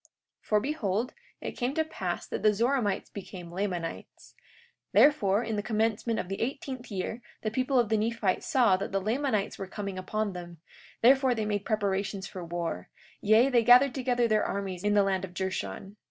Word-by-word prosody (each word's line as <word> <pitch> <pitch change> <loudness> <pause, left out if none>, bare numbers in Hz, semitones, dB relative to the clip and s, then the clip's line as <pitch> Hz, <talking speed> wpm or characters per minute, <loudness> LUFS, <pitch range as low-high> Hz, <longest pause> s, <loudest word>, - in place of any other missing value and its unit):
43:4 - - -28 0.4
For 210 - +4
behold, 235 -4 -1 0.3
it - - -4
came 250 +3 -2
to 320 - +2
pass 315 - -4
that - - -4
the 210 -1 +4
Zoramites 230 -3 0
became 180 -3 -8
Lamanites; 180 -3 -5 0.6
therefore, 215 -8 +4
in 220 -2 -2
the - - 0
commencement 220 +1 0
of - - -3
the 195 +1 -4
eighteenth 260 0 -4
year 210 +3 -4 0.2
the 215 - -1
people 255 +3 0
of 235 -4 +3
the 220 - +2
Nephites 215 -3 0
saw 250 - +4
that 195 - -4
the 195 - +1
Lamanites 215 0 -1
were 195 - -4
coming 195 -1 -5
upon 210 +2 -2
them; 175 -1 -8 0.5
therefore 260 0 +5
they 220 -2 -1
made 205 -1 -2
preparations 200 -2 -1
for 185 -2 -7
war; 170 0 -4 0.3
yea, 220 +5 +5
they 240 -3 +3
gathered 250 +3 +7
together 245 -2 +1
their 215 -1 +2
armies 195 -2 -3
in 205 0 +2
the 205 - +5
land 190 -1 0
of 180 -2 -7
Jershon. 190 - -4
210 Hz, 185 wpm, -29 LUFS, 195-245 Hz, 0.6 s, gathered